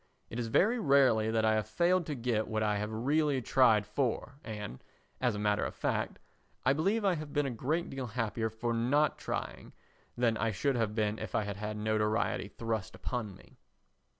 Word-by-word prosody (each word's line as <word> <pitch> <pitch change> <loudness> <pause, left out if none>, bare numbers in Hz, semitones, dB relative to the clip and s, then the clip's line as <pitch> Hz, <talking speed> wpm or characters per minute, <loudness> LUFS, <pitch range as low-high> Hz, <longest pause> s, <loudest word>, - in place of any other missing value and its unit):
It 115 - -4
is 120 - -2
very 215 - +3
rarely 135 - +4
that 110 0 +2
I 110 - +4
have 110 -1 0
failed 175 +8 +2
to 150 - -2
get 115 -3 0
what 110 -1 -1
I 105 -1 +1
have 105 +1 -3
really 140 +5 +1
tried 115 -4 +4
for 125 +4 -2
and, 105 - -7 0.4
as 125 -4 +1
a - - -3
matter 105 0 +1
of - - -3
fact, - - -1 0.5
I 135 - +5
believe 200 +9 +1
I 195 - +4
have 150 -3 -6
been 145 -1 +2
a 135 - -1
great 155 +9 -1
deal 135 -2 -4
happier 115 -1 -2
for 115 +2 -2
not 130 +7 +2
trying - - -5 0.4
than 120 -2 +2
I 115 +1 +1
should 135 +8 0
have 110 -3 0
been 110 -1 0
if - - -5
I 110 - +2
had 100 -1 -5
had 105 +1 -4
notoriety 110 0 0
thrust 110 -1 -4
upon 110 -6 -4
me. - - -19
115 Hz, 200 wpm, -32 LUFS, 110-140 Hz, 0.5 s, I